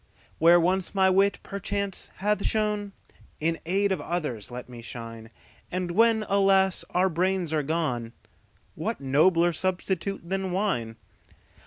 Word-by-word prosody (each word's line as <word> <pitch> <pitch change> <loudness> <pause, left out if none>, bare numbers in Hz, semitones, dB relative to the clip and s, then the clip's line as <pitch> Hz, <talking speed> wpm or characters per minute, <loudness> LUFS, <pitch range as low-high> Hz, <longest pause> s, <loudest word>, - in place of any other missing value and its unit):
Where 170 +2 +7
once 185 +3 0
my 190 -1 +4
wit, 195 +1 +3
perchance, 200 0 -3
hath 205 +1 0
shone, 210 -2 -1 0.5
In 165 +1 0
aid 195 +3 +2
of 185 -6 -1
others' 145 - -3
let 125 0 -7
me 120 -2 -10
shine; 115 -1 -8 0.4
And 180 -1 -2
when, 220 +2 +3
alas! 195 -1 +3
our 180 +2 +2
brains 180 -1 0
are 155 - +2
gone, 135 -7 -2 0.6
What - - -3
nobler 165 +6 +3
substitute 185 +1 -2
than 190 0 -2
wine? 175 - -1
185 Hz, 135 wpm, -26 LUFS, 155-195 Hz, 0.6 s, Where